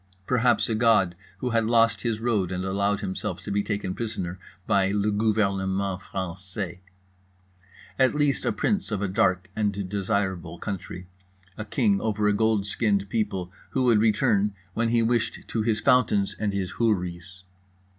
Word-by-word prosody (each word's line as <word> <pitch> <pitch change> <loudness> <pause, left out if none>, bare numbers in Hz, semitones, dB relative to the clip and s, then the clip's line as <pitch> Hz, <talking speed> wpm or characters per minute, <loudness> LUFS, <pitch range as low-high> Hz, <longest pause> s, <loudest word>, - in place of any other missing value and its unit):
Perhaps 125 0 +2
a 115 - -1
god 110 -6 +3 0.3
who 125 - -1
had 115 -1 +2
lost 115 0 +3
his 115 -3 -1
road 110 -6 0
and 90 0 -2
allowed 100 +1 0
himself 95 - -4
to - - -5
be 100 +1 +1
taken 100 -3 -3
prisoner 95 -5 -4 0.3
by 100 -3 +2
le 105 +1 +1
gouvernement 100 -3 0
français. 95 0 -5 1.2
At 130 +2 +4
least 145 -2 +1
a - - +1
prince 200 -3 0
of 105 -2 -2
a - - +1
dark 95 -1 +1
and 100 -3 -1
desirable 95 -4 -2
country, 90 -2 -6 0.5
a 105 - -6
king 105 -4 +1
over 105 -1 0
a 105 - +3
gold 110 -1 +2
skinned 100 -1 0
people 100 -5 -2 0.2
who 130 - 0
would 120 -4 +4
return 105 -2 +2 0.2
when 115 +3 0
he 115 0 +3
wished 115 -1 0
to 115 - -1
his 110 -1 +1
fountains 110 -6 +3
and 105 -2 0
his 95 -2 -2
houris. 95 -4 -1
105 Hz, 160 wpm, -26 LUFS, 95-115 Hz, 1.2 s, At